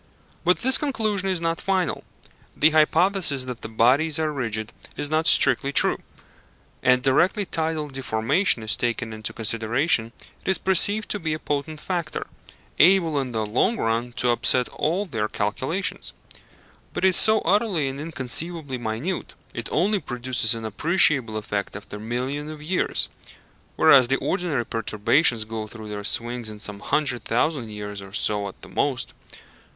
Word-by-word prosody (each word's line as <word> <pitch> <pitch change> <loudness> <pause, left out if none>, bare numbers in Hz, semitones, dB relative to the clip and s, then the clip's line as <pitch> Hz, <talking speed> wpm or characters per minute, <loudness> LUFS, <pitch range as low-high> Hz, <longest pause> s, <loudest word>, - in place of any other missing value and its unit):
But 180 +1 +3
this 260 +2 +5
conclusion 215 -9 -1
is 185 -2 0
not 165 0 -2
final. 190 -3 -1 0.5
The 155 +2 +5
hypothesis 155 -2 +3
that 125 -2 -6
the 110 - -7
bodies 135 +8 +2
are 155 -1 -1
rigid 115 -4 -3 0.2
is 145 - 0
not 160 +1 +1
strictly 135 +1 +4
true: - - +4 0.8
and 125 0 +3
directly 185 - +2
tidal 160 -3 -2
deformation 135 - 0
is 110 - 0
taken 115 -2 -2
into 110 -1 -5
consideration 115 +2 0 0.3
it - - -3
is 190 - +2
perceived 200 +3 +1
to 205 - 0
be 155 -3 -2
a - - -4
potent 150 +1 -3
factor, 170 -4 -3 0.5
able 170 -6 +5
in 130 -2 -5
the 110 -2 -2
long 125 - +1
run 115 - -1
to 125 0 +2
upset 125 +1 +2
all 180 +7 -1
their 115 - -2
calculations. 130 - -3 0.8
But - - 0
it - - +7
is 185 - 0
so 220 0 +3
utterly 190 -5 +1
and 135 +1 -5
inconceivably 155 -1 -3
minute 120 +11 -4 0.2
it - - -5
only 200 +6 +2
produces 125 -5 0
an 115 -1 -6
appreciable 135 - +2
effect 105 -2 -4
after 105 0 -8
millions 130 +7 -3
of 155 -1 -9
years 180 +4 0 0.7
whereas 130 -3 +6
the 135 +2 +1
ordinary 165 -10 -1
perturbations 115 +3 +1
go 110 -1 -5
through 110 -1 -10
their 105 -1 -5
swings 120 +2 -2
in 105 - -9
some 105 -1 -5
hundred 125 0 -1
thousand 120 0 0
years 105 -1 -6
or 95 0 -12
so 105 -1 -1
at 95 - -10
the - - -8
most. - - -2
135 Hz, 160 wpm, -24 LUFS, 115-165 Hz, 0.8 s, it